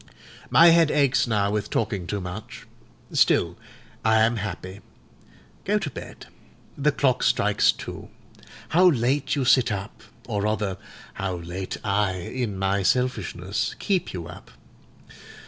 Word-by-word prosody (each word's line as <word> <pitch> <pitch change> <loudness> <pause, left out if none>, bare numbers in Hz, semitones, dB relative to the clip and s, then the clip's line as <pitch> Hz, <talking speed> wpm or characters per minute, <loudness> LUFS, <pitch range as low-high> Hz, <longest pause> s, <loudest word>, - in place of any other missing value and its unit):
My 170 +1 +7
head 165 -2 +5
aches 135 -4 +2
now 100 -3 +1
with 105 -1 -2
talking 100 -5 -2
too 105 - -2
much; 90 +3 -8 0.5
still - - +3 0.5
I 110 0 +4
am 115 +1 +2
happy. 100 -2 -6 0.8
Go 210 +2 +1
to 185 -8 -3
bed. - - -10 0.5
The 150 +1 +2
clock 130 -3 +1
strikes - - +3
two. - - -9 0.6
How 180 +3 +5
late 135 +1 +1
you 135 -3 -1
sit 125 -2 +4
up; 100 0 -5 0.2
or 105 - -2
rather 105 -2 -1 0.4
how 95 -2 -3
late 90 +2 -6
I, 100 -1 +1
in 100 +3 -4
my 95 +1 0
selfishness, 100 -5 -1
keep 190 -4 -1
you 85 -3 -6
up. - - -12
110 Hz, 135 wpm, -24 LUFS, 95-135 Hz, 0.8 s, My